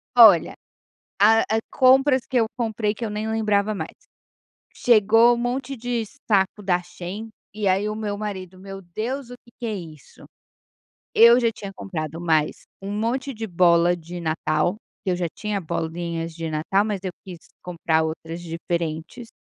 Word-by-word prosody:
Olha, - - +7 0.6
a 220 +3 +6 0.2
a - - +2
compras 260 0 +4
que 260 - -3
eu 225 - +3
comprei 220 -2 -1
que 235 - -5
eu - - -2
nem 210 +1 -3
lembrava 215 -1 +1
mais: 160 -4 -6 0.8
chegou 225 +1 +5
um - - -4
monte 245 +3 -3
de 240 -1 -2 0.2
saco 200 0 +1
da 180 -2 +1
Shein 180 +5 -7 0.2
e 210 -1 -1
aí 190 +2 +2
o 215 - -3
meu 210 -2 -3
marido: 190 -3 -6
"Meu 195 +1 -9
Deus, 230 +9 -5
o - - -7
que 235 - -20
que 235 - -3
é 215 - -2
isso?". 160 -6 -11 0.9
Eu 235 +2 +8
já 235 -2 +2
tinha 200 -2 -8
comprado 165 -4 -5
mais 160 -3 0 0.2
um 195 - -5
monte 245 +6 -1
de 225 -2 -5
bola 175 -1 +4
de 175 +1 -8
natal, 160 +2 0 0.3
que 190 - 0
eu - - 0
já 175 -1 -1
tinha 210 -2 -3
bolinhas 165 0 -4
de 165 -1 -4
natal, 160 +7 +1
mas 210 -3 -2
eu 185 - -3
quis 180 -3 -9 0.2
comprar 165 -2 0
outras 160 +1 -5
diferentes. 165 +5 -4
195 Hz, 170 wpm, -23 LUFS, 170-225 Hz, 0.9 s, Eu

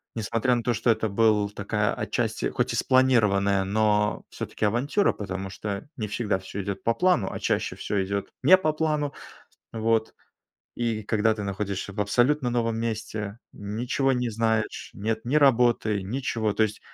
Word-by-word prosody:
несмотря 115 +3 +1
на 120 - -2
то, 120 0 +1
что 115 - 0
это 110 -1 +2
был 105 0 +3
такая 105 +1 -1
отчасти, - - -2
хоть - - -1
и - - -1
спланированная, 105 -7 +3
но 105 +1 +1
всё-таки - - -4
авантюра. 130 - +2
Потому 95 -1 -5
что 100 +2 -5
не 110 - -3
всегда 105 -1 -1
всё 95 +1 -6
идёт 100 0 -5
по 115 - +2
плану, 180 - +2
а - - -5
чаще - - -1
всё 100 -2 -1
идёт 100 +1 -3
не 185 +7 +8
по 155 -5 0
плану. 150 -2 -1 0.6
Вот 110 0 0 0.6
и 115 -2 -2
когда 110 +1 +1
ты 105 - -5
находишься 100 0 -3
в 105 - -4
абсолютно 125 +6 +2
новом 115 -2 0
месте, 110 -2 -4
ничего 120 +6 -1
не 125 -2 -1
знаешь, 110 0 -1
нет 110 +2 -2
ни 125 - -2
работы, 120 -7 +3
ничего. 110 0 -1
То 110 - +1
есть 105 -1 -1
110 Hz, 165 wpm, -26 LUFS, 100-120 Hz, 0.6 s, не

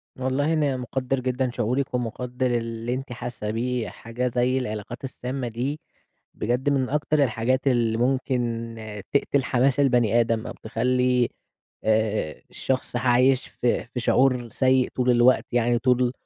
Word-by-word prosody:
والله، 130 +5 0
أنا 145 -4 +1
مُقدر 130 +1 -2
جدًا 130 0 -1
شعورِك، 125 +4 -1
ومُقدر 125 +1 -2
اللي 115 +1 -3
أنتِ 130 0 -5
حاسة 120 -3 -5
بيه، 120 0 -2
حاجة 120 +2 -4
زي 125 +1 +1
العلاقات 110 0 -5
السامة 130 0 -4
دي، 125 +6 -3 0.6
بجد 125 +5 0
من 135 -3 +1
أكتر 150 0 +2
الحاجات 130 +3 0
اللي 115 -3 +2
ممكن 120 -2 -1 0.4
تقتل 140 -1 +2
حماس 130 +1 +2
البني 120 -5 +3
آدم، 115 -1 -1
أو - - -5
تخلّي، 125 +2 +1 0.5
آآ، 110 -6 0
الشخص 130 -1 -2
عايش 125 +2 +3
في 120 - -1
في 125 +1 -5
شعور 125 -1 +2
سيء 130 +2 +2
طول 125 -1 +2
الوقت 120 +1 +4
يعني، 120 0 +2
طول 125 0 +2
125 Hz, 140 wpm, -25 LUFS, 120-130 Hz, 0.6 s, الوقت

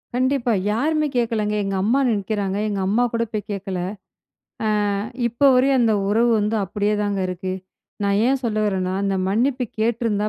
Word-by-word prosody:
கண்டிப்பா. 255 -1 +1 0.2
யாருமே 305 +7 +1
கேக்கலங்க. 225 -3 0
எங்க 195 0 -2
அம்மா 240 +7 +2
நிக்குகிறாங்க, 200 -2 -1
எங்க 205 -2 -2
அம்மா 220 +5 +2
கூட 230 0 +1
போய் 210 -1 -4
கேட்கல. 195 -2 -4 1.2
ஆ, - - -2 0.3
இப்ப 240 +5 +3
வரையும் 265 +1 +4
அந்த 225 -2 +3
உறவு 230 +3 +3
வந்து 210 +2 0
அப்டியேதாங்க 205 0 -1
இருக்கு. 185 +1 -4 0.5
நான் 200 0 +2
ஏன் 270 +1 +2
சொல்ல 215 -2 0
வரேன்னா, 185 -2 -1
அந்த 195 -1 0
மன்னிப்பு 250 +5 +1
கேட்டிருந்தா 220 -2 0
215 Hz, 150 wpm, -22 LUFS, 200-240 Hz, 1.2 s, வரையும்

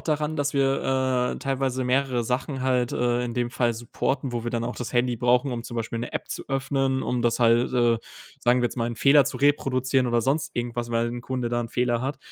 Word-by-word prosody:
daran, 155 0 -1
dass 145 -1 -1
wir, 130 -2 +1
äh, - - -7
teilweise 130 -1 -1
mehrere 125 -1 +1
Sachen 130 +2 -2
halt, 125 -2 +1
äh, 120 0 +1
in 120 -1 -4
dem 120 -1 -1
Fall 120 -2 0
supporten, 125 +3 -2
wo 120 -1 -3
wir 120 - -2
dann 115 -1 -2
auch 120 - -4
das 125 0 -5
Handy 120 0 +2
brauchen, 125 +3 +2
um 115 -1 -4
zum 120 0 -7
Beispiel 115 0 -3
'ne 120 - -4
App - - -4
zu - - -6
öffnen, 135 -1 0
um 125 -1 -1
das 120 -1 +1
halt, 120 0 +3
äh 120 -2 +3 0.4
sagen 125 +1 +3
wir - - +4
jetzt 120 - -7
mal, 115 - 0
'n 120 -1 -4
Fehler 140 -1 +5
zu - - -3
reproduzieren 130 -2 +2
oder 120 -1 +1
sonst 140 +4 -1
irgendwas, 120 0 -3
weil 115 0 +1
'n 120 +1 -5
Kunde 125 -1 -3
da 120 -1 -1
Fehler 120 0 0
hat 135 +2 -3
125 Hz, 235 wpm, -25 LUFS, 120-135 Hz, 0.4 s, Fehler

